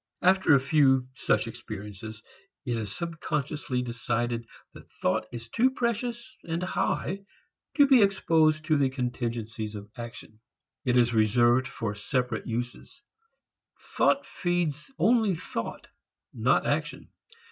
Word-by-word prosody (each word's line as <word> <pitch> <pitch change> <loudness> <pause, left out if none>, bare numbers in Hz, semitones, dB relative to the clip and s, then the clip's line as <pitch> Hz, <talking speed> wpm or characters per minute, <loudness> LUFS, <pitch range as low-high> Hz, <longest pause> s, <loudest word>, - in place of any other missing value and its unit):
After 185 -4 +5
a - - +5
few 135 -2 +3
such 130 - +1
experiences, 110 -1 -8 0.4
it 120 -3 -1
is 110 -3 -4
subconsciously 150 -5 -2
decided 120 -1 -2 0.3
that - - -14
thought 100 +4 -1
is 115 -1 -7
too 240 - +3
precious 240 0 -3
and 170 +1 -3
high 190 +1 -1 0.5
to 285 - +8
be 265 -4 +6
exposed 160 -6 +3
to 155 -1 +3
the 140 -2 +3
contingencies 115 -4 -3
of 105 0 -9
action. 115 -3 -9 0.5
It 125 -1 +3
is 120 -1 +4
reserved 120 +3 +4
for 110 -3 -4
separate 125 +4 -2
uses; 120 - -5 0.8
thought 280 - +1
feeds 175 - -2
only 220 -5 +3
thought 165 - -5 0.5
not - - +2
action. - - -2
130 Hz, 125 wpm, -28 LUFS, 115-170 Hz, 0.8 s, to